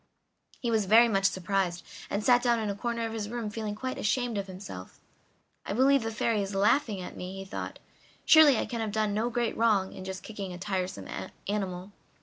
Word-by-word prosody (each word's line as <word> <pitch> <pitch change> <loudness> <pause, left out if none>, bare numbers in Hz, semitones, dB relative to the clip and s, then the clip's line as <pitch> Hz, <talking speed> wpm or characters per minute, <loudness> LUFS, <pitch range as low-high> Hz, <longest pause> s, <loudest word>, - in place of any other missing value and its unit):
He 235 - -1
was 220 -3 +2
very 230 +4 +7
much 195 -3 +1
surprised, 185 -2 0 0.3
and 205 +1 -2
sat 245 +1 +5
down 240 -1 +3
in 215 -2 -1
a - - -4
corner 235 +1 -2
of 225 - -4
his 210 -2 -4
room 230 -2 -4
feeling 215 -1 -4
quite 260 +4 -4
ashamed 245 +1 0
of 200 -1 -2
himself. 185 - -9 0.6
"I - - -4
believe 270 +4 +4
the 225 - -2
Fairy 220 -1 0
is 195 0 -4
laughing 205 +1 +2
at 180 - -8
me," 180 +1 -6
he 195 - -6
thought. 190 - -6 0.5
"Surely 310 -5 +8
I - - 0
can 235 -1 -4
have 220 -2 -2
done 215 -1 0
no 220 +3 0
great 235 -1 -1
wrong 210 -4 +2
in - - -8
just 190 0 -6
kicking 200 -4 -6
a - - -7
tiresome 185 -1 -3 0.4
animal! 190 -2 -3
210 Hz, 210 wpm, -29 LUFS, 195-230 Hz, 0.6 s, Surely